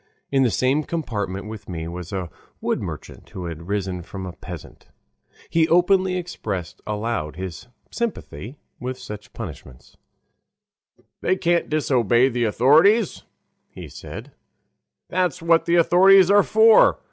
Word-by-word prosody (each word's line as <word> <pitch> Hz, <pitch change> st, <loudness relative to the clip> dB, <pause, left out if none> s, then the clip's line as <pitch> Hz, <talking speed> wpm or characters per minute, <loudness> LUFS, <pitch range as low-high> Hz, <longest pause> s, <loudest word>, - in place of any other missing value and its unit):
In 135 Hz, -1 st, +3 dB
the 130 Hz, -, +4 dB
same 130 Hz, +8 st, +1 dB
compartment 105 Hz, -, -4 dB
with 110 Hz, -2 st, -9 dB
me 80 Hz, -2 st, -5 dB
was 85 Hz, +1 st, -7 dB
a 90 Hz, -4 st, -4 dB, 0.3 s
wood -, -, -1 dB
merchant, -, -, -8 dB
who 90 Hz, -, -7 dB
had 85 Hz, 0 st, -7 dB
risen 95 Hz, -3 st, -2 dB
from 95 Hz, +2 st, -8 dB
a 90 Hz, -, -6 dB
peasant. 90 Hz, -2 st, -11 dB, 0.6 s
He 165 Hz, -1 st, +2 dB
openly 185 Hz, +2 st, +3 dB
expressed 105 Hz, -, -5 dB
aloud 105 Hz, -8 st, -3 dB
his 95 Hz, +4 st, -7 dB, 0.2 s
sympathy 140 Hz, -, -5 dB, 0.2 s
with 130 Hz, +1 st, -5 dB
such 105 Hz, -3 st, -9 dB
punishments. 65 Hz, -3 st, -10 dB, 1.2 s
"They 185 Hz, -, +2 dB
can't 175 Hz, -2 st, 0 dB
disobey 130 Hz, -5 st, +2 dB
the 120 Hz, -1 st, -1 dB
authorities," 155 Hz, -, +3 dB, 0.4 s
he -, -, -10 dB
said; -, -, -10 dB, 0.8 s
"that's 180 Hz, -5 st, 0 dB
what 165 Hz, 0 st, +3 dB
the 170 Hz, -, +2 dB
authorities 185 Hz, +3 st, +6 dB
are 205 Hz, 0 st, +7 dB
for. 220 Hz, +2 st, +5 dB
120 Hz, 135 wpm, -22 LUFS, -, 1.2 s, are